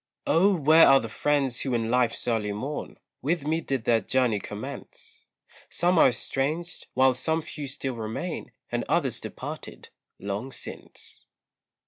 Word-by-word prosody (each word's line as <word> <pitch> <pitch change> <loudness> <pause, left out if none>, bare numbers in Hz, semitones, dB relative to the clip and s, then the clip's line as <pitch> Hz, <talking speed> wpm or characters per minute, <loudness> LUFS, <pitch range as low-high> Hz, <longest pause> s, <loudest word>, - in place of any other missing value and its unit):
Oh! 195 +4 +4
where 160 +1 +7
are 135 0 +7
the 115 - -5
friends 140 0 +1
who 130 -3 -1
in 115 -1 0
life's 125 -2 +1
early 110 -3 0
morn, 135 +8 -5 0.2
With 160 +1 0
me 160 +2 +1
did 135 -6 -2
their 115 -1 +3
journey 125 -5 +1
commence; 455 - -9 0.4
Some 175 0 +2
are - - +8
estranged, 140 +7 -1
while 130 0 +5
some 160 +5 -1
few 145 -2 -6
still 135 0 -3
remain, 115 +10 -4 0.2
And - - 0
others - - +1
departed - - -7 0.3
long 100 +6 -4
since. - - -7
135 Hz, 145 wpm, -27 LUFS, 120-160 Hz, 0.4 s, are